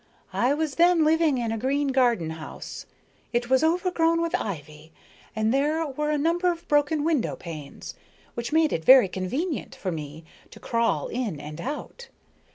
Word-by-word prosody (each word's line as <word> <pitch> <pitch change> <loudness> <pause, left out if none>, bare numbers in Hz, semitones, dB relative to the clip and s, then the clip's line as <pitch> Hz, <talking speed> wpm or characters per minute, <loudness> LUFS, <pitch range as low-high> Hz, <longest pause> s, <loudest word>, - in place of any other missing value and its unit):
I 255 +4 +2
was 310 -2 -2
then 345 -2 +5
living 315 -3 +3
in 235 -2 -1
a 225 - -2
green 280 +4 0
garden 240 -11 +2
house. 160 -1 -8 0.5
It 240 +1 -1
was 260 +3 +4
overgrown 335 0 +2
with 335 0 -1
ivy, 155 -4 -5 0.4
and 220 +1 +1
there 300 +4 +1
were 300 +1 -3
a 300 - +1
number 340 +4 +2
of 340 -1 -8
broken 295 +1 +2
window 310 -6 0
panes, 155 -5 -8 0.4
which 235 +2 -4
made 315 0 +3
it 160 - -2
very 255 +1 +8
convenient 260 - -3
for 185 - -4
me 155 0 -7 0.3
to - - -14
crawl 230 -11 0
in 225 - -3
and 150 +3 -8
out. 300 - -6
265 Hz, 165 wpm, -25 LUFS, 195-315 Hz, 0.5 s, very